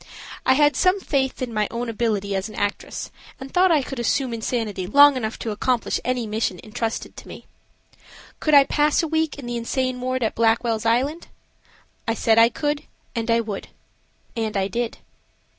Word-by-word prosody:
I 260 - +7
had 295 +1 +4
some 370 +2 +3
faith 265 -7 -1
in 240 -2 -4
my 210 -1 +1
own 235 +1 -4
ability 215 -3 -1
as 190 +3 -2
an - - -11
actress 205 0 -3 0.3
and 265 0 -9
thought 370 +1 +5
I 300 -4 +3
could 270 -1 -6
assume 245 +1 0
insanity 220 -5 -2
long 285 +6 +7
enough 225 -3 -3
to 225 - -4
accomplish 240 +3 0
any 250 -1 -1
mission 215 -4 -2
intrusted 225 +1 -4
to - - -11
me. - - -10 0.9
Could 305 -1 +3
I 280 - +9
pass 295 +3 +2
a - - 0
week 320 -1 0
in 280 - -8
the 240 0 -3
insane 255 +2 -2
ward 255 0 -1
at 220 - 0
Blackwell's 225 0 +1
Island? 275 +9 0 0.8
I 225 - +1
said 225 0 +3
I 230 +1 +7
could 295 +4 -2 0.3
and 230 0 -2
I 230 0 +4
would. 215 -3 -6 0.7
And 220 -3 -2
I 190 0 +1
did. 235 +2 -3
235 Hz, 185 wpm, -23 LUFS, 225-275 Hz, 0.9 s, I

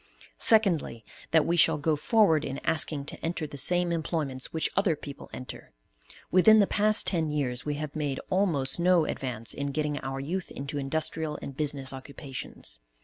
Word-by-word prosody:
Secondly, 180 - +2 0.2
that 160 -1 +4
we 170 - +1
shall 165 -2 +5
go 150 +1 +1
forward 165 -1 +3
in 135 - -4
asking 155 -3 0
to - - -7
enter 165 -1 -2
the 145 - -9
same 175 +5 +3
employments 155 -5 -2
which 160 - -1
other 195 -5 +2
people 145 -1 -10
enter. 125 - -9 0.6
Within 215 +4 +7
the 205 - +5
past 215 +2 +3
ten 165 -4 +1
years 135 -3 -2
we 145 - -1
have 150 0 -5
made 145 -3 -2
almost 175 -8 +1
no 175 -2 +4
advance 120 -6 -4
in 140 - -3
getting 150 +1 -2
our 135 0 -5
youth 175 +7 -3
into 140 +1 -5
industrial 155 +2 -1
and 140 - -7
business 140 -2 -1
occupations. 130 - -7
150 Hz, 170 wpm, -28 LUFS, 140-170 Hz, 0.6 s, Within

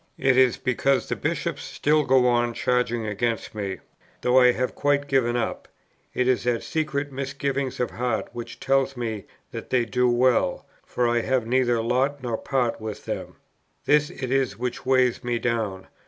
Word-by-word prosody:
It 135 -1 +3
is 130 -2 +4
because 130 +2 +1
the - - -2
Bishops 165 -1 -2
still 150 +3 +1
go 130 -1 +4
on 120 -1 +1
charging 120 -2 0
against 110 +1 -2
me, 100 -3 -4 0.4
though 125 +1 +4
I 125 -1 +6
have 125 +1 -2
quite 145 0 +1
given 125 -3 +2
up: 115 - -3 0.5
it 125 - +1
is 130 -1 +2
that 120 -1 0
secret 145 -2 -2
misgiving 140 0 -2
of 125 - -1
heart 120 -1 -2
which 120 -1 -7
tells 135 0 +1
me 110 -4 -4 0.3
that - - -7
they 125 -2 +2
do 125 +3 +1
well, 120 0 +2 0.2
for 120 - 0
I 120 0 +2
have 130 -1 0
neither 120 -1 +1
lot 130 +4 0
nor 120 -2 -1
part 125 -5 -1
with 110 -1 -6
them: - - -5 0.5
this 150 0 +3
it 130 -2 -5
is 130 -7 +1
which 125 +1 -4
weighs 130 -2 +3
me 120 -1 0
down. 110 -6 -2
125 Hz, 175 wpm, -24 LUFS, 120-135 Hz, 0.5 s, I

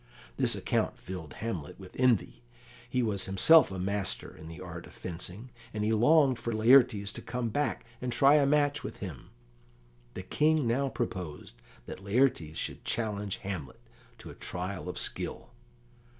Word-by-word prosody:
This - - +5
account - - -1
filled 90 -5 -8
Hamlet 95 -10 -5
with 95 -1 -12
envy; 125 -5 +2 0.5
he 125 -1 +1
was 100 -4 +1
himself 125 - +6
a 95 - -5
master 100 +1 -3
in 80 - -11
the 80 +2 -9
art 85 -2 -8
of - - -16
fencing, 90 +7 -7 0.2
and 105 - -1
he 110 +1 +2
longed 130 +2 +4
for 115 +1 -3
Laertes 110 -3 +5
to - - -7
come 125 -2 -3
back 145 +3 -1 0.2
and 125 -1 -2
try 135 +4 +5
a 140 -2 +3
match 145 0 +2
with - - -6
him. 80 -10 -8 0.9
The 95 - -5
King 155 +6 +2
now 135 +4 +1
proposed 90 - -5 0.3
that 95 - -9
Laertes 100 - +1
should - - -4
challenge 105 -3 -2
Hamlet 90 -9 -5 0.4
to - - -10
a - - -10
trial 90 +1 -5
of - - -5
skill. - - -2
105 Hz, 165 wpm, -30 LUFS, 90-125 Hz, 0.9 s, himself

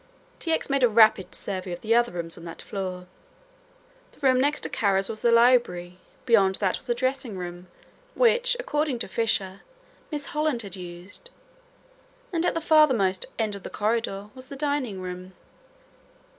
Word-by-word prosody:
T. 330 - -2
X. 320 - 0
made 275 -1 0
a 245 - +5
rapid 215 -3 +4
survey 185 -2 -5
of 175 - -8
the 225 +1 +1
other 240 +1 +3
rooms 170 -2 -3
on 165 - -11
that 165 - -9
floor. 185 -2 -5 1.1
The - - -21
room 260 -2 +4
next 290 +2 +1
to - - -2
Kara's 195 -2 +1
was 215 -1 -6
the 235 - +3
library, 230 -7 +3 0.3
beyond 200 -6 +4
that 190 -2 0
was 255 - -16
a 240 - +2
dressing 255 -4 -2
room 175 0 -7 0.5
which, - - +3
according 300 - -1
to - - -4
Fisher, 195 -2 -1 0.5
Miss 295 -2 -4
Holland 300 -6 0
had 195 -2 -8
used, 180 - -11 1.0
and 340 +1 +1
at - - 0
the 330 - -1
farthermost 260 - +3
end 220 -2 -1
of 200 - -5
the - - -7
corridor 210 -2 -2
was 260 0 -11
the 280 - -8
dining 275 -9 -2
room. 185 0 -7
225 Hz, 170 wpm, -25 LUFS, 190-270 Hz, 1.1 s, a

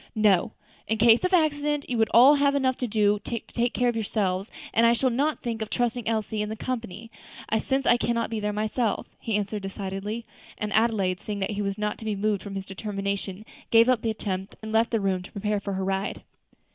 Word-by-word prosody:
"No; 215 0 +3 0.3
in 220 - 0
case 230 +1 +5
of 365 - +1
accident 295 -4 +1
you 250 - -2
would 220 -1 +3
all 255 +5 +8
have 280 -1 +3
enough 260 -2 +2
to 250 - -2
do 210 -1 +2
to 235 +2 -4
take 240 +2 -2
care 245 - +2
of 240 - +2
yourselves, 200 -3 -1 0.2
and 230 +1 +5
I 235 - +5
shall 255 +2 +1
not 290 +6 0
think 230 -2 -3
of 215 - -3
trusting 240 -1 -1
Elsie 220 -1 -1
in 210 - -2
the 220 - -4
company, 230 -3 -5 0.5
since 270 +4 -1
I 240 - +5
cannot 235 -1 -1
be 225 - -1
there 210 0 -1
myself," 215 +2 -1
he 225 - -2
answered 205 0 -3
decidedly; 195 +3 -5 0.3
and 210 0 -3
Adelaide, 210 -5 +2
seeing 205 -2 -3
he 205 +1 -2
was 200 0 -2
not 210 0 -2
to 220 - -9
be 215 -1 -1
moved 205 0 0
from 200 -1 -7
his 195 -1 -4
determination, 200 0 -4 0.2
gave 230 +1 +6
up 250 -3 +3
the 225 - -1
attempt, 195 -2 -4
and 220 - -5
left 225 +1 +3
the 225 - +1
room 190 -2 0
to 180 - -12
prepare 210 +1 -1
for 200 0 -4
her 190 0 -2
ride. 195 +1 -2
220 Hz, 220 wpm, -26 LUFS, 200-235 Hz, 0.5 s, all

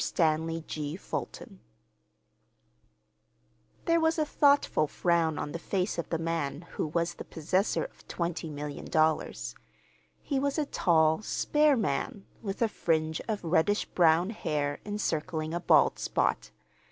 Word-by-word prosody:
STANLEY 165 0 0
G. 150 0 -4
FULTON 190 - -6 2.3
There 335 0 +3
was 320 0 +2
a 310 - +2
thoughtful 285 - +3
frown 165 -1 +1
on 145 - -3
the 170 - -5
face 185 0 -1
of 170 - -4
the 165 - 0
man 160 -3 -2
who - - -2
was 170 +2 -1
the - - -8
possessor 185 +5 0
of - - -11
twenty 170 -2 -3
million 145 -1 -6
dollars. 155 0 0 0.7
He 275 -3 0
was 280 +2 0
a 305 - +1
tall, 160 - +3
spare 295 +5 +2
man, 195 0 -2 0.2
with 200 +1 -2
a - - +4
fringe 160 -5 0
of 215 -4 -2
reddish 175 +5 +2
brown 170 +3 +3
hair 145 -8 -2
encircling 160 -5 -2
a 175 - -1
bald 175 - +4
spot. - - 0
170 Hz, 140 wpm, -29 LUFS, 155-210 Hz, 2.3 s, a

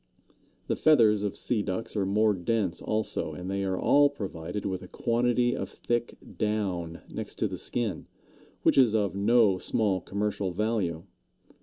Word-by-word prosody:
The - - -1
feathers 115 -9 +4
of 100 -2 -3
Sea 115 -4 0
Ducks 105 +3 -4
are 100 -2 0
more 105 +2 +3
dense 95 -1 -1
also, 110 0 -2
and 90 +1 -6
they 100 0 -1
are 95 -1 -1
all 145 +7 +5
provided 95 -7 -5
with 95 -2 -2
a - - -10
quantity 120 +1 +1
of 95 -6 -4
thick 120 +3 -2 0.2
down 95 -6 -2
next - - -6
to - - 0
the - - -5
skin, 115 -5 -2 0.6
which - - +4
is 120 -4 +5
of 105 -3 +1
no 100 -1 +3
small 100 -3 0
commercial 100 -1 -2
value. 95 -5 -1
105 Hz, 160 wpm, -28 LUFS, 95-115 Hz, 0.6 s, all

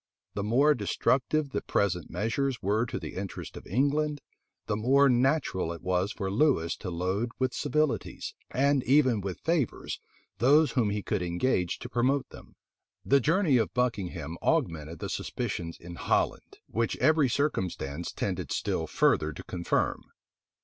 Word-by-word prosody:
The 100 - -2
more 135 +8 +4
destructive 135 +5 0
the - - -1
present 90 -4 0
measures 125 +4 -1
were 105 +4 +1
to - - -4
the - - -6
interests 95 0 -6
of - - -10
England, 145 - +1 0.5
the 105 - -1
more 135 +6 +4
natural 125 - +2
was 90 +2 0
it - - -8
for 95 -2 -2
Lewis 105 - +2
to 95 - -6
load 95 +7 -1
with 130 0 0
civilities, 150 -8 -1 0.2
and 140 +1 +2
even 130 -5 +4
with 95 -2 -5
favors, 160 -7 -1 0.4
those 145 +4 +5
whom 115 -5 +1
he 100 0 -2
could - - -1
engage 90 +1 0
to - - -7
promote 125 +3 +1
them. - - -14 0.5
The 140 - +5
journey 160 - +3
of 105 -5 -1
Buckingham 95 -10 -2
augmented 80 -1 0
the - - -5
suspicions 85 -1 -4
in 85 0 -9
Holland, - - -1
which 115 0 -1
every 155 -4 +4
circumstance 90 - -2
tended 90 -6 -3
still - - -1
further 75 0 +2
to - - -9
confirm. 85 -1 -1
115 Hz, 150 wpm, -28 LUFS, 90-140 Hz, 0.5 s, those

